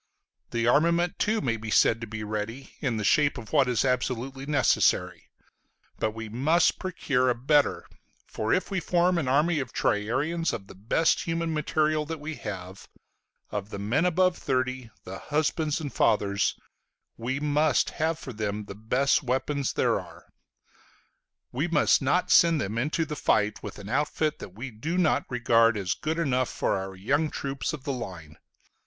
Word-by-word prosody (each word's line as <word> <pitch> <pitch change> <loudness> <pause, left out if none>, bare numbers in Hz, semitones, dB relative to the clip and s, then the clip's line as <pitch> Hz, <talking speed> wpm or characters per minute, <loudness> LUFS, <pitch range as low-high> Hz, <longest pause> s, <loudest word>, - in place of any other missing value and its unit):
The 115 -1 -1
armament 170 +6 +2
too 215 +1 +1
may 115 -4 0
be 110 0 -7
said 115 +1 +3
to 115 - -5
be 110 0 -6
ready, 110 +5 -5
in 125 -6 -1
the 105 - -2
shape 145 +9 +3
of 120 +3 -9
what 140 -4 +4
is 125 +1 +1
absolutely 130 +1 -2
necessary: 145 -3 +2 0.7
but 110 - +1
we 115 0 -6
must 150 +10 +2
procure 140 -8 0
a 125 - +2
better, 140 +4 +2 0.4
for 110 0 -3
if 185 +2 +1
we 190 - 0
form 175 0 +2
an 145 - -2
army 150 +5 +2
of 130 -3 -4
triarians 140 +11 0
of 95 - -5
the - - -13
best 115 - +1
human 165 -1 -1
material 155 0 +1
that 165 0 -5
we 155 +2 -5
have, 95 -2 -7 0.6
of 105 0 -4
the 100 - -6
men 120 - +1
above 180 0 +2
thirty, 130 -2 -1
the 95 +1 -8
husbands 150 0 -1
and 145 -4 -5
fathers, 100 -2 +2 0.6
we 130 +4 -3
must 150 0 +2
have 160 +1 -1
for 130 -5 -8
them 105 -1 -3
the 100 - -8
best 125 +7 +1
weapons 135 +1 -1
there - - +1
are. - - -13 1.3
We 140 +7 -1
must 160 -4 +3
not 145 +7 +1
send 170 -3 +6
them 110 -1 -2
into 155 +5 0
the 150 - -5
fight 105 -4 +1
with - - -8
an 100 -1 -9
outfit 150 +4 -1
that 95 - -10
we 130 +4 -6
do 150 +11 -3
not 160 -5 +2
regard 115 -2 +3
as 95 -2 -1
good 155 +8 -3
enough 130 -6 +1
for - - -1
our 95 0 -5
young 140 +11 0
troops 140 0 -3
of 150 -4 -7
the 140 -2 -2
line. 85 -10 -8
135 Hz, 175 wpm, -27 LUFS, 110-155 Hz, 1.3 s, send